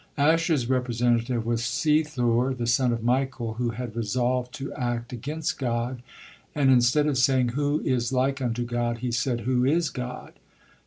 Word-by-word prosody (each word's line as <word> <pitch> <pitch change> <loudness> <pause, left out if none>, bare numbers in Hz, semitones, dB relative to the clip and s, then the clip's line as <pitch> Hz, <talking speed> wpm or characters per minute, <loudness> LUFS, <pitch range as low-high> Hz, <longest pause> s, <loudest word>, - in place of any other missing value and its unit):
Asher's 160 -3 +2
representative 120 -2 0
was 115 0 0
Sethur, 130 -2 +1
the 120 - -2
son 120 +1 +2
of 115 -1 -2
Michael, 125 -2 0
who 120 -1 0
had 115 0 -6
resolved 125 +2 -1
to 135 0 -6
act 120 -2 -3
against 150 +6 -3
God 120 -1 -2 0.5
and 140 -3 +4
instead 125 +4 +4
of 145 -4 +1
saying, 130 -1 +3
"Who 145 +4 0
is 125 -2 0
like 135 +1 0
unto 120 -1 -1
God?" 120 -1 -1
he 125 - -1
said, 120 0 -1
"Who 125 0 +1
is 155 +4 +2
God?" 125 -1 -6
125 Hz, 160 wpm, -26 LUFS, 120-135 Hz, 0.5 s, and